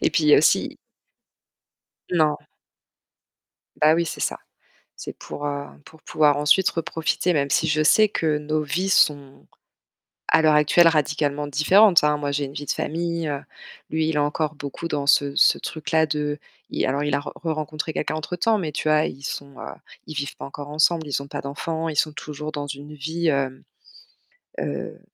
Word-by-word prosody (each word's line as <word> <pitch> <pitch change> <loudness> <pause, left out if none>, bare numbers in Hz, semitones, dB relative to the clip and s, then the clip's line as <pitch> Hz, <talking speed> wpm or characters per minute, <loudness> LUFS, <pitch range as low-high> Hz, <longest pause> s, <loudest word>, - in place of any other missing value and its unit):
Et - - +2
puis 155 - +1
il - - +3
y - - +9
a - - +6
aussi - - +2 1.3
Non. 155 -4 +2 1.5
Bah 155 +1 +6
oui, 170 0 0
c'est - - -6
ça. - - -1 0.6
C'est - - -8
pour, 145 - -7
heu, 145 0 -3 0.2
pour 160 0 -17
pouvoir 150 -2 +2
ensuite 150 +6 +4
reprofiter, 165 +1 -1
même 140 -2 0
si 165 - +2
je 155 0 +2
sais 215 +7 +5
que 155 -6 0
nos 155 +1 -2
vies 180 +6 -2
sont 145 -7 +1 0.8
à 160 - +4
l'heure 155 -1 +5
actuelle 150 +3 +5
radicalement 150 -1 0
différentes, 175 +7 +5
hein. 150 0 +3
Moi, 145 -1 -3
j'ai 145 0 -1
une 135 - -7
vie 145 0 -7
de - - -3
famille, 170 0 -3
heu, 140 -1 -3 0.5
lui 160 0 0
il 160 - -1
est - - +2
encore 150 +1 -1
beaucoup 145 +4 -6
dans 145 -2 -2
ce 140 0 +3
ce - - +5
truc-là 160 0 -1
de 150 -1 -2 0.3
il - - -2
alors 140 +2 0
il 145 - 0
a - - +1
re 145 - -8
re-rencontré 155 -1 -4
quelqu'un 155 0 -2
entre 155 +3 -5
temps, 220 +4 +2
mais 155 -5 -3
tu 155 - -2
vois, 155 0 +3
ils 135 - -8
sont, 140 -1 -6
heu, - - -6 0.4
ils 155 - -7
vivent 140 -1 -4
pas - - -8
encore 145 +1 -8
ensemble, 155 +2 +2
ils 140 -1 -2
ont 140 - -11
pas - - -5
d'enfants, 160 +4 -4
ils 155 - -4
sont 155 +1 +2
toujours 150 0 -6
dans 145 -1 -4
une 145 +2 -8
vie, 160 +3 -2
hem, 135 -2 -1 1.0
heu - - -5
150 Hz, 195 wpm, -23 LUFS, 145-160 Hz, 1.5 s, y